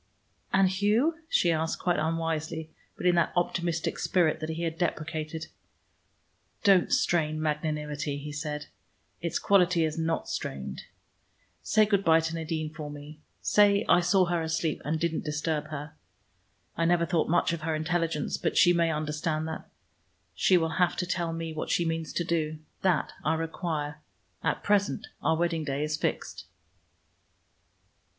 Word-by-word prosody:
"And 195 0 +5
Hugh?" 215 - +2
she 175 - +3
asked, 160 0 0
quite 175 -1 0
unwisely, 160 0 -2 0.3
but - - -6
in 180 - +5
that 170 -1 +2
optimistic 170 -1 -1
spirit 170 -4 +2
that 155 0 -4
he 160 +1 -3
had 165 -1 -3
deprecated. 160 -2 -2 1.2
"Don't 195 -4 +5
strain 155 -3 +2
magnanimity," 150 -1 -2
he 150 +1 -6
said. 150 0 -4 0.6
"It's 170 -1 -1
quality 180 -4 +3
is 155 +1 -3
not 165 0 -1
strained. 65 -1 -5 0.8
Say 215 0 +4
good 200 -2 +1
by 165 -2 +6
to 165 0 -2
Nadine 160 -1 -3
for 155 -2 -6
me. 145 +1 -10 0.2
Say 205 -1 +4
I 175 - +6
saw 185 +2 +3
her 170 -1 0
asleep, 160 -1 -1
and 155 +2 -1
didn't 170 -1 -1
disturb 150 0 -1
her. 155 +1 -7 0.8
I 165 - +1
never 170 0 +3
thought 165 -3 0
much 175 +1 +2
of 165 - -4
her 160 0 -1
intelligence, 165 -1 -1
but - - -1
she 175 -1 +7
may 170 -1 +2
understand 155 +1 -2
that. 160 - -7 0.6
She 185 - +4
will 160 -1 -1
have 180 - +3
to 180 - -1
tell 175 -2 -1
me 165 0 -4
what 155 - -4
she 170 - +2
means 165 -1 -2
to 175 - 0
do. 160 -2 -1 0.2
That 185 -5 +1
I 160 +2 +2
require. 160 -2 -3 0.4
At - - 0
present 200 -1 +1 0.2
our 160 - +2
wedding 170 -1 0
day 140 0 -2
is 150 0 -1
fixed." - - -3
165 Hz, 160 wpm, -28 LUFS, 155-175 Hz, 1.2 s, she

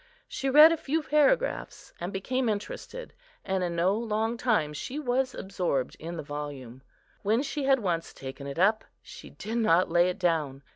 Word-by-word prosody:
She 270 - -3
read 300 +4 +9
a 330 - +1
few 310 +2 -1
paragraphs, 300 - +1
and 175 +2 -4
became 245 +6 -1
interested, 215 - -5 0.3
and 190 -1 0
in 175 -1 -2
no 175 +3 +2
long 225 0 -1
time 220 -12 +1
she 250 - -5
was 260 -2 0
absorbed 180 -9 -2
in 170 +2 -6
the - - -5
volume. 145 -4 -7 0.4
When 220 +6 +1
she 290 -1 -3
had 270 0 +5
once 170 -4 -2
taken 135 +1 -8
it 140 - -6
up, 210 +5 +3 0.2
she - - -11
did 225 +2 -4
not 180 -6 +3
lay 175 +1 +4
it 180 - -4
down. 155 -7 -1
195 Hz, 180 wpm, -28 LUFS, 165-255 Hz, 0.4 s, read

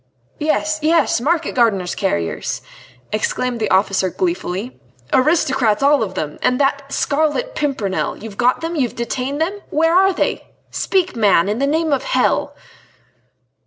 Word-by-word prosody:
"Yes! 310 0 0
yes! 320 -6 +2
market 320 +3 0
gardener's 200 -8 +1
carriers," 85 - -2 0.5
exclaimed 235 +3 -1
the 215 -2 -1
officer 190 0 +2
gleefully, 250 - -3 0.3
"aristocrats 265 -5 +2
all 285 -1 +4
of 190 -4 -3
them... 150 -4 -4
and 250 - +1
that 280 0 +2
d - - -16
d 275 - -9
Scarlet 310 - 0
Pimpernel. 260 -10 -2
You've 215 -2 -9
got 245 +4 +2
them? 330 +1 -3
You've 260 -6 -1
detained 255 +4 -3
them?... 375 +6 -1
Where 325 +2 +2
are 385 +2 +5
they?... 370 - -2 0.2
Speak, 370 -5 0
man, 200 -6 +3
in 210 +3 -1
the 275 - +1
name 315 +1 +1
of 275 - +1
hell!..." - - 0
270 Hz, 155 wpm, -19 LUFS, 215-315 Hz, 0.5 s, are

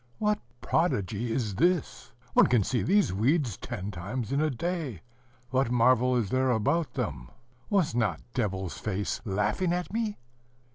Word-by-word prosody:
"What 210 0 +1 0.2
prodigy 115 - 0
is 110 -4 -1
this? 175 - 0 0.2
one - - +6
can 120 -4 +3
see 120 +5 0
these 200 - +3
weeds 120 - +1
ten 95 +3 -5
times 105 +7 -4
in 140 +2 +1
a 155 - +2
day: 150 - -3 0.5
what 130 -1 +2
marvel 125 +1 +4
is 110 -5 -1
there 130 0 +2
about 125 +5 +1
them? - - -3 0.4
was 190 - +2
not 115 -3 0
devil's 95 -7 -2
face 105 -1 -2
laughing 105 - 0
at 180 +2 -3
me?" 220 -2 -1
125 Hz, 150 wpm, -28 LUFS, 105-165 Hz, 0.5 s, one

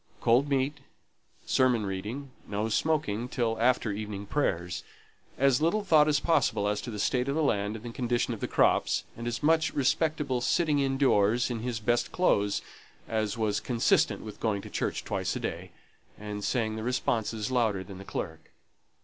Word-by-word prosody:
Cold 125 +5 +3
meat, 140 +1 0 0.7
sermon 125 -5 +2
reading, 105 +9 -5 0.2
no 105 +2 -2
smoking 125 -4 0
till 115 -3 -1
after 120 -2 +2
evening 100 -1 -5
prayers, 90 - -1 0.6
as 135 0 +3
little 205 +7 +2
thought 155 -6 +5
as 150 -2 +3
possible 155 -11 +2
as 105 0 0
to - - -6
the 110 - -5
state 125 +5 0
of 140 - 0
the 160 - +1
land 105 -5 0
and 110 +1 -9
the 120 - -5
condition 120 0 -1
of 110 - -7
the - - -2
crops, - - +2
and 115 +1 -6
as 120 +3 -3
much 160 0 +3
respectable 145 -2 +1
sitting 150 +3 +2
in 135 -1 +1
doors 120 -2 +3
in 115 - -2
his 120 0 -3
best 120 +2 0
clothes 105 - +1 0.4
as 110 0 -1
was 105 -2 0
consistent 120 -3 +1
with 105 -2 -9
going 100 -3 -1
to - - -10
church - - -2
twice - - -2
a - - -2
day, - - -4 0.5
and 105 -1 -6
saying 110 -3 0
the - - -4
responses 115 -2 -1
louder 110 -7 +1
than 95 -1 -10
the - - -8
clerk. 80 -4 -6
120 Hz, 180 wpm, -29 LUFS, 105-135 Hz, 0.7 s, thought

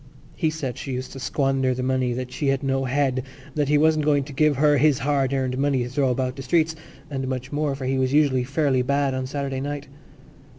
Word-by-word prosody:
He 160 - +1
said 145 -6 -4
she 135 -3 -5
used 130 +1 -4
to 135 - -8
squander 135 -1 0
the 125 - -3
money, 130 -1 +1
that 125 +1 -5
she 140 +3 -2
had 135 0 +1
no 135 0 0
head, 130 0 +1 0.3
that 145 -2 0
he 150 - +4
wasn't 155 0 +3
going 145 -2 +3
to 145 +1 -10
give 150 +1 +3
her 145 +1 +4
his 150 -1 +4
hard 140 0 +1
earned 130 -1 -1
money 140 -3 +1
to 120 - -5
throw 135 +1 +1
about 125 0 -1
the - - -5
streets, 160 +3 +1 0.4
and 135 -1 -3
much 130 0 -4
more, 145 -1 0
for 135 -1 -6
he 130 +1 0
was 130 0 +1
usually 140 -3 +3
fairly 135 -1 +1
bad 140 +1 +1
of 130 0 -2
a - - -5
Saturday 135 -1 -3
night. 145 0 -4
135 Hz, 240 wpm, -24 LUFS, 130-145 Hz, 0.4 s, he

